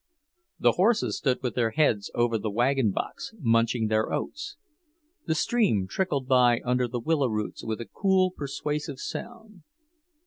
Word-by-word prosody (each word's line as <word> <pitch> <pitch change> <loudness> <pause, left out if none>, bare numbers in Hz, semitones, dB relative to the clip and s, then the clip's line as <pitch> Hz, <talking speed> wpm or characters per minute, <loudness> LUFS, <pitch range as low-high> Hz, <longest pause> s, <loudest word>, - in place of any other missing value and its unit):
The - - +4
horses 220 +5 +1
stood 130 -2 0
with 125 - -1
their 115 -2 +1
heads 110 -7 +1
over 120 -2 +1
the 110 - -2
wagon 120 +2 +2
box, 160 - -5
munching 115 -3 +2
their 110 0 +1
oats. 400 +7 -4 0.7
The 160 - +1
stream 175 - +2
trickled 145 - -1
by 125 -2 +4
under 125 0 +1
the 120 +1 -4
willow 145 +2 +1
roots 105 -2 -3
with 110 -1 -3
a 115 - -5
cool, 190 - +2
persuasive 150 -2 -4
sound. 225 - -8
130 Hz, 150 wpm, -27 LUFS, 115-175 Hz, 0.7 s, The